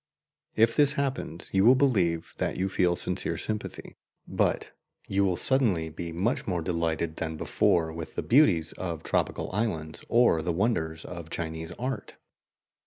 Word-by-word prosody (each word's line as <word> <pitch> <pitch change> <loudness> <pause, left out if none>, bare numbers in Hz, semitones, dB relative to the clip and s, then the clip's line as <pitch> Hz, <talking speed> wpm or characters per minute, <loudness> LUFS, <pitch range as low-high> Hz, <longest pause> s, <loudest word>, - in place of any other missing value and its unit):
If 115 +1 +4
this 145 -1 +5
happens, 135 - -3
you 95 0 +4
will 125 +4 +7
believe 95 -12 +1
that - - -1
you 95 +1 0
feel 90 -2 +2
sincere - - -1
sympathy, 105 -1 -4 0.3
but - - 0 0.4
you 100 0 +1
will 90 -3 +1
suddenly 100 -12 +1
be 85 +2 -5
much 95 +9 -1
more 90 -4 -1
delighted 85 -1 -1
than 80 -1 -3
before 80 0 +1
with 80 -1 -7
the - - -2
beauties 100 - +4
of 85 -4 -4
tropical - - -1
islands 85 -7 -2
or 120 -9 +4
the 85 - -1
wonders 80 -5 -1
of 85 -2 -8
Chinese 80 0 -4
art. 125 -4 -5
90 Hz, 155 wpm, -28 LUFS, 80-115 Hz, 0.4 s, will